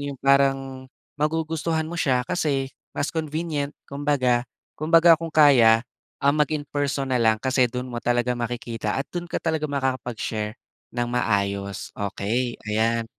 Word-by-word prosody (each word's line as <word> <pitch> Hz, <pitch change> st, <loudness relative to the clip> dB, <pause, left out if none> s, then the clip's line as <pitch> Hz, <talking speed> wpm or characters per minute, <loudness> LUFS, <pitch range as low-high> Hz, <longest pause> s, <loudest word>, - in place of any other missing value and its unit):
yung 140 Hz, -1 st, -5 dB
parang, 135 Hz, -1 st, +2 dB, 0.3 s
magugustuhan 160 Hz, +1 st, -1 dB
mo 165 Hz, -, -6 dB
siya 130 Hz, -7 st, +1 dB
kasi 140 Hz, -4 st, 0 dB, 0.2 s
mas 145 Hz, -, -3 dB
convenient, 155 Hz, -2 st, -2 dB, 0.2 s
kumbaga 140 Hz, -4 st, +1 dB, 0.3 s
kumbaga 165 Hz, +2 st, +6 dB
kung 165 Hz, +1 st, -5 dB
kaya, 120 Hz, -7 st, +6 dB, 0.3 s
ah, 140 Hz, +1 st, +3 dB
mag-in-person 145 Hz, -2 st, -1 dB
nalang 110 Hz, -3 st, +3 dB
kasi 130 Hz, 0 st, +2 dB
dun 125 Hz, +1 st, -4 dB
mo 120 Hz, -2 st, -6 dB
talaga 120 Hz, 0 st, +1 dB
makikita 120 Hz, -2 st, -3 dB
at 135 Hz, -, -2 dB
dun 175 Hz, -1 st, -4 dB
ka -, -, -1 dB
talaga 160 Hz, -2 st, -1 dB
makakapag-share 125 Hz, -5 st, -2 dB, 0.3 s
nang 120 Hz, 0 st, -2 dB
maayos. 100 Hz, -4 st, -1 dB
Okey, 110 Hz, +5 st, -2 dB
ayan. 115 Hz, +2 st, +1 dB
135 Hz, 130 wpm, -24 LUFS, 120-150 Hz, 0.3 s, kumbaga